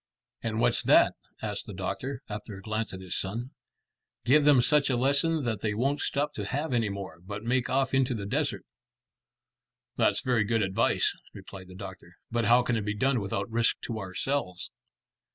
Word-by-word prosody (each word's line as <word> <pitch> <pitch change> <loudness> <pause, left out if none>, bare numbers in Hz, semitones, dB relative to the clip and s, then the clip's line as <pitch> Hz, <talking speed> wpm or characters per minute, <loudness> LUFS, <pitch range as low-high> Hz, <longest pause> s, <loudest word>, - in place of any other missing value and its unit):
"And 110 -1 -2
what's - - +3
that?" - - +5 0.3
asked 105 -2 -3
the 105 - -7
doctor, 130 +8 -4
after 105 -1 -6
a - - -10
glance 110 +1 -2
at 95 - -7
his 95 -1 -4
son. 115 +7 -2 0.7
"Give 145 +4 +5
them 145 -3 +7
such 140 +4 +4
a 125 - +2
lesson 140 +5 +2
that 110 -5 -2
they 105 -1 -1
won't 135 +6 0
stop 145 +1 0
to 105 - -4
have 140 +6 -2
any 115 -3 +2
more, 100 -5 -6
but 100 +3 -7
make 125 +1 +1
off 135 0 +1
into 130 -2 +2
the 100 -3 -4
desert." 100 - -1 1.3
"That's - - +3
very 125 -4 +2
good 115 +1 +1
advice," 95 0 +2 0.2
replied 95 -2 -10
the 90 - -12
doctor, 95 -3 -9 0.2
"but 115 -1 +1
how 120 +3 +5
can 120 -2 0
it - - -1
be 105 +1 -2
done 130 +3 +2
without 100 -1 -2
risk 115 0 +2
to 115 -2 -4
ourselves?" 95 0 -2
115 Hz, 190 wpm, -28 LUFS, 100-130 Hz, 1.3 s, them